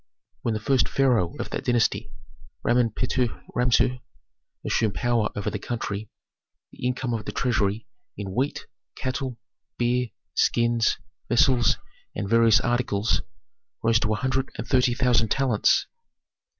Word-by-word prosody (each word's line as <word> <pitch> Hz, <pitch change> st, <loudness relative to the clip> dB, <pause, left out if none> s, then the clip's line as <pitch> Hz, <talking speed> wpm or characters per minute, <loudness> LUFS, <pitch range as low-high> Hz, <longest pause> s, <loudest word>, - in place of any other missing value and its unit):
"When 115 Hz, -2 st, -1 dB
the -, -, -2 dB
first 130 Hz, +3 st, +2 dB
pharaoh 125 Hz, -11 st, +2 dB
of -, -, -5 dB
that -, -, -3 dB
dynasty, 115 Hz, -3 st, +1 dB, 0.6 s
Ramen 120 Hz, -2 st, +3 dB
Pehuti 125 Hz, -1 st, 0 dB, 0.2 s
Ramessu, 125 Hz, +1 st, +2 dB, 0.7 s
assumed 105 Hz, -3 st, +1 dB
power 115 Hz, +2 st, +1 dB
over 100 Hz, -, -2 dB
the -, -, -3 dB
country, 110 Hz, -3 st, -4 dB, 0.6 s
the 125 Hz, -, -4 dB
income 125 Hz, -1 st, -2 dB
of 110 Hz, -2 st, -3 dB
the -, -, -4 dB
treasury 110 Hz, -4 st, 0 dB, 0.3 s
in 95 Hz, -2 st, -5 dB
wheat, 135 Hz, +6 st, -1 dB, 0.3 s
cattle, 130 Hz, -1 st, -3 dB, 0.4 s
beer, 125 Hz, +1 st, +1 dB, 0.3 s
skins, 115 Hz, -1 st, +2 dB, 0.3 s
vessels, 120 Hz, +1 st, +4 dB, 0.4 s
and 100 Hz, -, -3 dB
various 115 Hz, +2 st, +5 dB
articles 120 Hz, -4 st, +1 dB, 0.6 s
rose 115 Hz, -1 st, +4 dB
to 110 Hz, -, 0 dB
a -, -, +2 dB
hundred 130 Hz, +3 st, -1 dB
and -, -, -4 dB
thirty 125 Hz, -2 st, +3 dB
thousand 120 Hz, -3 st, +2 dB
talents. 130 Hz, -4 st, +2 dB
120 Hz, 135 wpm, -25 LUFS, 110-125 Hz, 0.7 s, various